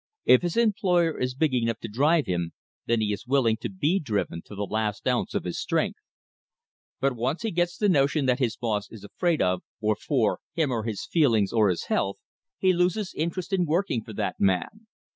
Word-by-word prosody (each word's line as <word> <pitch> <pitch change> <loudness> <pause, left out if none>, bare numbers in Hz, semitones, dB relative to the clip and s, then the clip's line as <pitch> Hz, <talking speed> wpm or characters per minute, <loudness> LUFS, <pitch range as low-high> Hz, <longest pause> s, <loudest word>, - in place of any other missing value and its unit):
If 125 - +6
his 175 +3 -2
employer 185 -7 +2
is 125 0 -1
big 150 0 +1
enough 115 -2 +1
to - - -4
drive 145 +8 +2
him, 85 -2 -2 0.3
then 115 -1 +2
he 105 -1 0
is 105 - -7
willing 125 -4 +3
to - - -5
be 185 0 +1
driven 105 - -2
to 105 - -10
the 100 - -2
last 105 0 -2
ounce - - 0
of - - 0
his - - -4
strength. - - -1 1.0
But 135 -1 +1
once 130 - -2
he 225 - -1
gets 175 0 0
the 210 - +2
notion 145 -4 +3
that 125 0 +2
his 120 -5 0
"boss" 105 -4 -2
is 110 - -11
afraid 170 - 0
of, 90 0 +1 0.2
or 110 0 +1
for, 115 +1 0 0.2
him 160 -5 +1
or 115 -3 -2
his 110 -4 -3
feelings 115 - +2
or 110 -3 +4
his 90 - -1
health, 95 0 -1 0.4
he 185 -1 +3
loses 180 +3 0
interest 170 +4 -3
in 180 -3 +2
working 155 - 0
for 110 - -10
that - - -3
man. 100 - 0
130 Hz, 205 wpm, -26 LUFS, 110-170 Hz, 1.0 s, If